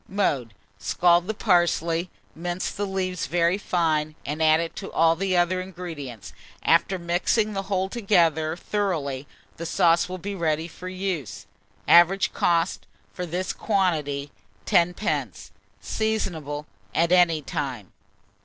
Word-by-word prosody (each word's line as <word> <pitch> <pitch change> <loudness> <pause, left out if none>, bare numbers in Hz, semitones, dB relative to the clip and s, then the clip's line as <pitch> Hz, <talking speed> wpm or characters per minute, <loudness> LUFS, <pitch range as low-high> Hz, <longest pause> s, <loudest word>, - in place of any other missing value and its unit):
Mode. 140 - -1 0.2
Scald 175 0 +3
the 220 - -2
parsley, 175 -3 +2 0.2
mince 175 +2 -3
the 205 0 -3
leaves 185 -2 -2
very 170 +5 +2
fine, 155 -5 0
and 150 +3 -3
add 155 0 +5
it 165 0 -4
to 195 - -6
all 165 0 +4
the 185 +1 0
other 180 +1 +2
ingredients; 165 - -8 0.3
after 170 +3 +3
mixing 180 +5 0
the 195 - -1
whole 190 -1 +1
together 170 -8 +2
thoroughly, 155 -10 -2 0.3
the 170 - -5
sauce 170 -1 +3
will 185 - -4
be 200 +3 -5
ready 160 -3 -1
for 180 +2 -8
use. 180 - -4 0.4
Average 175 +3 +5
cost, 170 +1 +1 0.3
for 180 -1 -5
this 180 +3 -2
quantity, 150 -9 0 0.3
10d. 180 +1 0 0.3
Seasonable 165 -10 -2 0.3
at 170 +1 +2
any 170 -4 +4
time. 130 -10 -4
175 Hz, 130 wpm, -25 LUFS, 160-185 Hz, 0.4 s, add